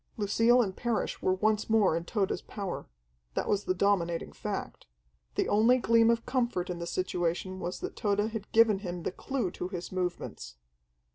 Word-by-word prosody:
Lucille 230 +4 +4
and 190 -3 -4
Parrish 235 -2 -2
were 185 - +2
once 215 +2 +1
more 215 -7 +4
in 165 - -2
Tode's 195 +2 -1
power. 200 -4 -5 0.5
That - - -1
was 205 -1 +1
the 185 - +1
dominating 175 -3 +1
fact. - - -5 0.5
The - - +1
only 225 +5 +5
gleam 230 -2 +4
of 235 0 +1
comfort 240 -8 0
in 175 - -5
the 170 - -4
situation 185 +1 -2
was 175 +1 -4
that - - -5
Tode 205 0 0
had 215 -2 -6
given 225 -3 +5
him 175 -3 -5
the - - -1
clue 240 -2 -2
to 180 - -4
his 180 -1 -6
movements. 175 - -4
200 Hz, 180 wpm, -30 LUFS, 180-225 Hz, 0.5 s, only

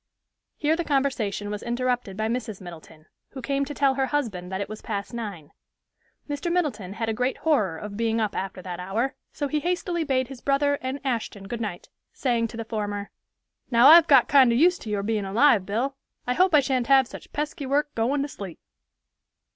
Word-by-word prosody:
Here 305 +2 +2
the 345 - -2
conversation 250 -9 -1
was 210 0 -4
interrupted 245 -4 -2
by 220 0 0
Mrs. 225 -3 -3
Middleton, 165 -3 -12 0.3
who 265 - -7
came 275 +2 0
to 290 - -6
tell 275 -1 +3
her 265 0 0
husband 220 -10 -2
that 190 - -2
it 200 - -3
was 215 0 -8
past 200 +1 -4
nine. 200 -10 -6 0.8
Mr. 295 +4 -3
Middleton 255 - -1
had 225 +1 -3
a 225 - 0
great 250 +4 -1
horror 215 - +1
of 205 +1 -7
being 230 0 0
up 215 -2 -1
after 190 -1 -4
that 180 -1 -6
hour, 215 +9 -1 0.2
so 290 - -3
he 300 +2 0
hastily 350 +1 -1
bade 260 -4 0
his 265 -2 -10
brother 285 +1 +1
and 260 +2 -3
Ashton 220 -6 -3
good 230 +2 -5
night, 205 -6 -5 0.3
saying 235 -3 0
to 225 - -10
the 230 - -4
former, 205 -2 -4 0.6
"Now 240 +2 +7
I've 335 +1 +9
got 270 -4 +6
kind 265 -4 +6
of 235 - +2
used 350 +5 +4
to 220 - -7
your 205 -1 -1
being 215 -1 -1
alive, 210 0 +3
Bill, 245 +7 -1 0.3
I 250 - +1
hope 365 +2 +4
I 295 - +7
shan't 260 -3 0
have 270 0 +6
such - - -11
pesky 300 -1 -3
work 290 +2 0
goin' 265 +5 0
to - - -3
sleep." 195 - -8
240 Hz, 205 wpm, -25 LUFS, 205-280 Hz, 0.8 s, I've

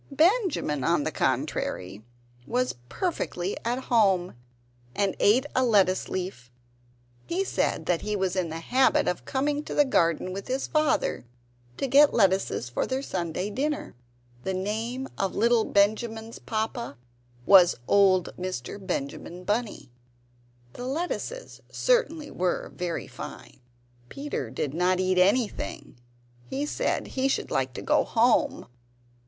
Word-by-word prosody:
Benjamin, 320 - +2
on 165 0 +2
the - - -2
contrary, 95 +4 -2 0.4
was 250 +1 0 0.2
perfectly 200 - -2
at 245 +3 -1
home, 195 -6 +2 0.6
and 200 -2 +1
ate 245 +7 +4
a 260 - +3
lettuce 195 -6 +3
leaf. 180 -10 -5 0.8
He 365 +3 0
said - - -1
that 175 -2 +1
he 210 0 -2
was 190 -2 -1
in 180 -3 0
the 165 +1 -5
habit 260 +8 +3
of 180 - -2
coming 290 +2 -1
to - - -6
the 290 - +5
garden 170 - +1
with 195 +1 -6
his 260 +1 -1
father 305 - 0 0.5
to - - -1
get 280 +3 +5
lettuces 190 - +2
for 120 - -2
their 265 +1 -2
Sunday 180 - -3
dinner. 290 +6 -2 0.5
(The 190 - -2
name 225 +7 -3
of 195 -1 -1
little 230 +1 +3
Benjamin's 220 +2 0
papa 220 - -3 0.5
was 180 0 +7
old 190 -3 +4
Mr. 185 +1 -5
Benjamin 175 +1 -4
Bunny.) 210 - -2 0.8
The 250 - -6
lettuces 355 - -4
certainly 460 -12 +1
were 180 0 -1
very 175 -2 -4
fine. - - -10 0.5
Peter 280 - -4
did 130 +3 -3
not 180 +2 +2
eat 185 0 +2
anything; 205 +5 0 0.5
he 280 +2 -2
said - - -1
he 265 0 0
should 275 - -1
like 130 -1 0
to - - -7
go - - +3
home. - - +2
205 Hz, 135 wpm, -27 LUFS, 180-265 Hz, 0.8 s, was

